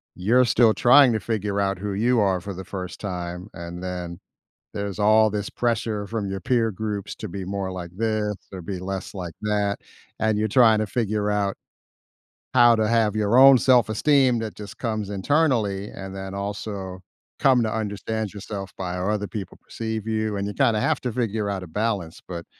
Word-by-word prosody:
you're 120 +8 +3
still 115 -2 +4
trying 125 0 +6
to 110 - 0
figure 105 -3 -2
out 100 -2 0
who 100 0 -3
you 120 +4 +2
are 95 -3 +2
for 100 0 -6
the 95 0 -8
first 90 -2 -6
time, 90 0 -5
and 85 +1 -7
then 90 -1 -5 0.5
there's 100 -1 -4
all 110 +1 +5
this 105 -1 -3
pressure 110 -3 -1
from 105 -2 -3
your 95 0 -3
peer 115 +1 +1
groups 105 0 -4
to 110 - -6
be 95 +1 -6
more 95 0 -3
like 85 -2 -7
this 110 -2 0 0.2
or 90 - -6
be 90 +1 -5
less 95 +2 -5
like 90 -4 -6
that, 105 -1 0 0.4
and 110 -1 +1
you're 110 +1 +1
trying 110 -1 +5
to 110 - -1
figure 105 -2 -1
out 100 -1 0 1.0
how 120 -2 +7
to 110 -1 +1
have 110 -2 +2
your 105 +3 +2
own 135 -1 +9
self-esteem 125 +1 +3
that 110 -1 -4
just 105 -1 -10
comes 110 -4 -3
internally, 105 -3 +1
and 95 0 -8
then 95 0 -6
also 100 -2 -5 0.4
come 130 -3 +4
to 110 - 0
understand 110 0 -3
yourself 100 -2 -7
by 90 -1 -3
how 90 +3 -1
other 105 -1 -1
people 100 -5 -7
perceive 110 -1 -5
you, 110 -2 -1
and 100 0 -2
you 105 - -4
kinda 110 -2 +2
have 155 +2 +1
to 125 -3 -2
figure 110 -3 -1
out 95 -2 -3
a - - -7
balance, 100 -2 -3
but 85 -2 -7
105 Hz, 190 wpm, -24 LUFS, 95-110 Hz, 1.0 s, own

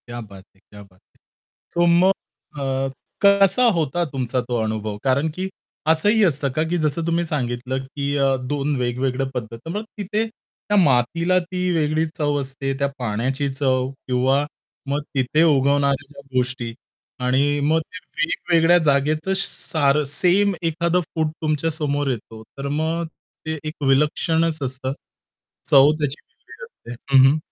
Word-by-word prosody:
क्या 120 0 -6
बात 100 -3 -12
है! - - -27
क्या 105 +1 -15
बात 95 -2 -23 0.2
है! - - -32 0.5
सो 175 0 +3
मग 175 +3 +5 0.5
अ, 135 0 -1 0.3
कसा 200 +3 +5
होता 165 +2 0
तुमचा 130 -3 -2
तो 120 0 -3
अनुभव? 110 -1 -3
कारण, 140 +4 +2
की 185 +5 -4 0.4
असंही 205 +8 +3
असतं 145 -6 +1
का, 155 +5 0
की 175 - +1
जसं 155 0 -1
तुम्ही 170 +1 +1
सांगितलं, 130 -3 -2
की 140 +1 -3
अ, 135 -1 +3
2 140 +3 -2
वेगवेगळ्या 130 +2 -1
पद्धती. 115 +3 -6
मग 210 +4 -3
तिथे 210 +2 -1
त्या 205 -1 -5
मातीला 170 +4 +3
ती 180 +1 -3
वेगळी 155 0 +1
चव 145 -2 +1
असते, 135 0 -3
त्या 140 - +2
पाण्याची 125 +5 -1
चव 130 -2 +1 0.2
किंवा 130 +3 +2 0.4
मग 145 +1 0
तिथे 135 +4 +2
उगवणाऱ्या 140 -2 +2
ज्या 140 -1 -13 0.2
गोष्टी 125 -2 -1 0.5
आणि 140 +3 +2
मग 160 +2 +3
ते 185 - -6 0.3
वेगवेगळ्या 170 0 +3
जागेचं 155 +5 +2
सारं 150 -6 +1
सेम 195 +3 +3
एखादं 170 +1 +1
फूड 160 -1 +1
तुमच्या 155 0 0
समोर 145 -2 -1
येतो, 110 -2 -7
तर 140 0 -4
मग 160 +3 -1 0.4
ते 160 0 -2
एक 155 -1 -6
विलक्षणच 155 +3 +2
असतं. 130 0 -3 0.8
चव 140 +1 +7
त्याची 145 0 -2
वेगळी - - -14
असते. 120 - -12 0.2
हं, 130 - +8
हं. 150 - +1
145 Hz, 150 wpm, -22 LUFS, 130-165 Hz, 0.8 s, हं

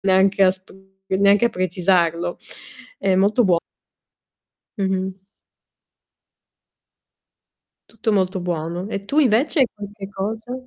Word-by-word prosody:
Neanche 195 +1 +3
a 185 - +6
sp 185 0 -15 0.4
neanche 200 +3 +4
a - - +1
precisarlo. 175 -3 0 0.6
È 190 - +1
molto 205 +5 +3
buo 180 -4 +3 1.2
Mh-mh. 190 -1 -2 2.7
Tutto 225 0 -2
molto 190 -1 +1
buono. 175 0 -3
E 200 -2 -5
tu 280 +9 -1
invece 270 +3 +3
hai 265 - +5
qualche 205 -1 -9
cosa? 220 +5 -5
195 Hz, 105 wpm, -21 LUFS, 185-210 Hz, 2.7 s, a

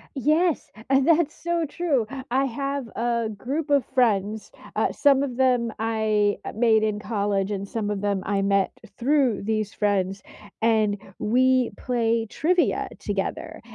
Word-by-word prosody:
Yes, 310 +5 +1 0.2
and 270 0 +3
that's 330 -2 +3
so 340 -1 -1
true, 285 -7 -1 0.2
I 265 +2 +2
have 275 +1 -3
a 235 0 0
group 280 +9 -3
of 285 -2 +4
friends, 215 -4 +1 0.2
uh, - - +1
some 280 -2 +3
of 255 -4 -4
them 250 -3 +2
I 220 -2 +1 0.2
made 220 -1 +3
in 210 -1 0
college, 205 -2 -1
and 200 0 -3
some 210 0 -3
of 205 -2 -2
them 200 -2 0
I 200 -1 0
met 195 -1 +2 0.3
through 260 -5 +2
these 215 -1 -1
friends, 195 -2 0 0.4
and 220 -2 +2 0.2
we 255 +2 +2
play 230 -2 0
trivia 350 - +1
together, - - -4
230 Hz, 145 wpm, -24 LUFS, 210-275 Hz, 0.4 s, of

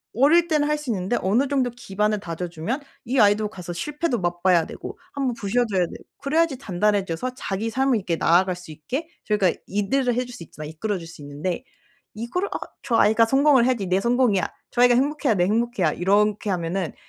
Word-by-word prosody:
어릴 315 +8 +5
땐 305 -2 +2
할 300 +1 +1
수 295 -4 -7
있는데 195 +2 -1
어느 225 +9 +2
정도 265 -3 +1
기반을 210 -2 -1
다져주면 175 - -4 0.2
이 255 +3 0
아이도 210 0 +4
가서 180 -4 -8
실패도 295 - -2
맛봐야 175 -1 +2
되고 - - -8 0.2
1 275 -2 -1
번 245 - -1
부서져야 210 -2 0
되고 - - -11 0.2
그래야지 310 0 +1
단단해져서 200 0 0
자기 215 -2 -3
삶을 265 +1 +2
이렇게 180 -5 -1
나아갈 180 +3 +3
수 180 -3 -11
있게 250 - -5 0.2
저희가 205 -4 +2 0.2
리드를 240 +5 0
해 250 +1 0
줄 - - -13
수 - - -11
있잖아요. 155 -1 -9
이끌어 200 +6 -2
줄 165 - -9
수 165 -2 -12
있는데 150 - -4 0.5
이걸 235 - -2
아 - - -4 0.3
'저 245 -4 0
아이가 220 +2 +5
성공을 270 0 +4
해야지 240 -6 0
내 185 +1 +2
성공이야. 235 -5 +2 0.2
저 240 - +1
아이가 245 0 +6
행복해야 275 -2 +1
내 175 - +2
행복이야.' 215 -6 +1
이렇게 205 +3 +1
하면은 175 0 -2
215 Hz, 420 characters per minute, -23 LUFS, 185-255 Hz, 0.5 s, 아이가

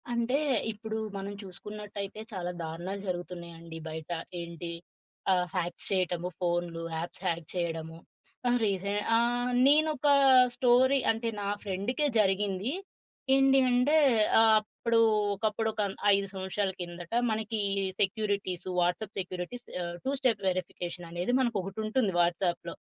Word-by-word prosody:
అంటే 235 +3 +1 0.3
ఇప్పుడు 220 +1 -5 0.2
మనం 195 +1 -5
చూసుకున్నట్టయితే 205 +2 -7
చాలా 180 -2 -3
దారుణాలు 170 +5 -5
జరుగుతున్నాయండి. 170 -2 -6
బయట 160 +1 -7 0.3
ఏంటి? 170 0 -6 0.6
ఆహ్, 180 -1 +2
హ్యాక్స్ 175 -1 -2
చేయటము 180 -2 0
ఫోనులు, 175 -1 -1
యాప్స్ 170 +2 -6
హ్యాక్ 170 -2 -1
చేయడము. 165 -2 -3 0.5
తను 245 0 +3
రీసే 200 0 -1 0.2
ఆహ్, 240 +1 +2 0.2
నేను 305 +2 +6
ఒక 290 - 0 0.5
స్టోరీ 260 +2 +4
అంటే, 225 +1 -2
నా 200 - -2 0.2
ఫ్రెండ్‌కే 205 +9 -1
జరిగింది. 195 +2 +1 0.6
ఏంటి 270 0 +5
అంటే 250 +5 +3 0.4
ఆ - - +7 0.2
అప్పుడు 230 +2 -1 0.3
ఒకప్పుడు 215 +2 -1
ఒక 215 - -2 0.3
5 195 0 +1
సంవత్సరాల 190 +1 -2
కిందట 175 -1 -7 0.2
మనకి 220 0 -2 0.4
సెక్యూరిటీస్, 200 -3 -1
వాట్సాప్ 180 +4 0
సెక్యూరిటీస్, 185 +6 -5 0.2
ఆహ్, 175 0 -4
2 270 - +1
స్టెప్ 240 -7 +1
వెరిఫికేషననేది 175 +1 -3
మనకొకటుంటుంది 215 -1 0
వాట్సాప్‌లో 175 0 0
195 Hz, 120 wpm, -29 LUFS, 175-225 Hz, 0.6 s, ఆ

